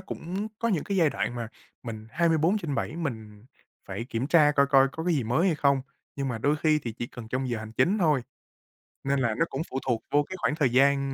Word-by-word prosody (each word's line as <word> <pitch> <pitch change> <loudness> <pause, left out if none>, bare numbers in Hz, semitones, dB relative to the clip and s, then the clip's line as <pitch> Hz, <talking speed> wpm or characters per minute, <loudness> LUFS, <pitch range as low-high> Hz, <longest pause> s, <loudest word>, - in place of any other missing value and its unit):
cũng 190 +3 -5
có 230 - 0
những 180 -8 0
cái 200 -1 -2
giai 160 -5 +4
đoạn 120 - -2
mà 120 -2 -4 0.3
mình 110 -2 -7
24/7 165 - +1
mình 110 -9 -5 0.4
phải 115 - -4
kiểm 120 +1 -3
tra 150 -2 +5
coi 140 0 +5
coi 135 -1 +5
có 160 - -5
cái 175 -2 +2
gì 135 - +1
mới 125 - +2
hay 170 - +3
không, 140 -2 +2 0.3
nhưng 135 -1 -2
mà 115 - -3
đôi 145 +7 +1
khi 155 0 +2
thì 120 -5 -5
chỉ 120 +2 -5
cần 120 -3 -10
trong 130 +1 -2
giờ 120 -2 -2
hành 110 0 -8
chính 195 - +2
thôi. 150 -8 +2 0.8
Nên 140 0 +1
là 120 -4 +1
nó 165 - +3
cũng 135 - -3
phụ 130 - -2
thuộc 115 -3 0
vô 145 0 +4
cái 185 - -8
khoảng 150 - 0
thời 145 -5 +2
gian 140 +2 +3
140 Hz, 235 wpm, -27 LUFS, 120-160 Hz, 0.8 s, tra